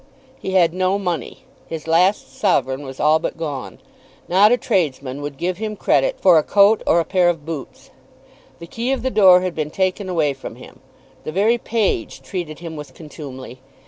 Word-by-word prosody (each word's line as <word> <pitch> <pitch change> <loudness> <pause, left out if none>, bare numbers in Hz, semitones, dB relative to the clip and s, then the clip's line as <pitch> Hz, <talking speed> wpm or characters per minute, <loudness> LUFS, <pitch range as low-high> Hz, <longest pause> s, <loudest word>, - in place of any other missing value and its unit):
He 190 - -5
had 170 -3 +4
no 185 +1 +1
money. 175 -9 -4 0.2
His 160 -2 -6
last 180 +5 +2
sovereign 130 +1 +1
was 135 -1 -9
all 155 +1 +4
but - - -4
gone. 140 - -5 0.5
Not 200 +5 +5
a 245 - +4
tradesman 145 - -1
would 145 -1 -6
give 180 +3 -2
him 215 -1 -4
credit - - +1
for 175 -4 +6
a - - -1
coat 205 +2 +4
or 170 - +4
a 165 - 0
pair 180 -2 +2
of 165 -4 -3
boots. 160 -4 -8 0.7
The 170 - -10
key 235 +9 -3
of 265 - -3
the 260 - -1
door 190 -5 +6
had 185 -1 -2
been 155 -2 -3
taken 190 +3 -1
away 155 -5 +1
from 135 - -9
him. - - -14 0.4
The - - -5
very 215 +7 +2
page 205 - -2
treated 155 +2 -5
him 165 -2 -8
with 150 -1 -9
contumely. 135 -5 -10
170 Hz, 190 wpm, -20 LUFS, 150-195 Hz, 0.7 s, for